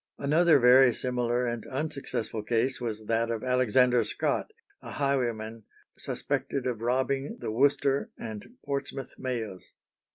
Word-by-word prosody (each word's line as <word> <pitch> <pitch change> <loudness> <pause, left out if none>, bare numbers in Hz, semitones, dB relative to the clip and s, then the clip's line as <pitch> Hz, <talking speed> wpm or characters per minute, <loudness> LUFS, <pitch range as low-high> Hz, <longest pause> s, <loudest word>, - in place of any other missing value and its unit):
Another 155 +3 +4
very 125 -1 +6
similar 125 -1 0
and 120 -2 -3
unsuccessful 140 -6 -3
case 120 +3 0
was 110 -2 -4
that 115 +1 0
of 115 -2 -3
Alexander 125 -1 +3
Scott, - - -1 0.3
a - - -8
highwayman 115 -6 -1 0.3
suspected 140 -1 -2
of 120 -3 -2
robbing 135 - 0
the - - -4
Worcester 140 +3 +2
and 110 -2 -7 0.2
Portsmouth 140 -1 -4
mails. 115 -7 -4
125 Hz, 125 wpm, -28 LUFS, 115-135 Hz, 0.3 s, very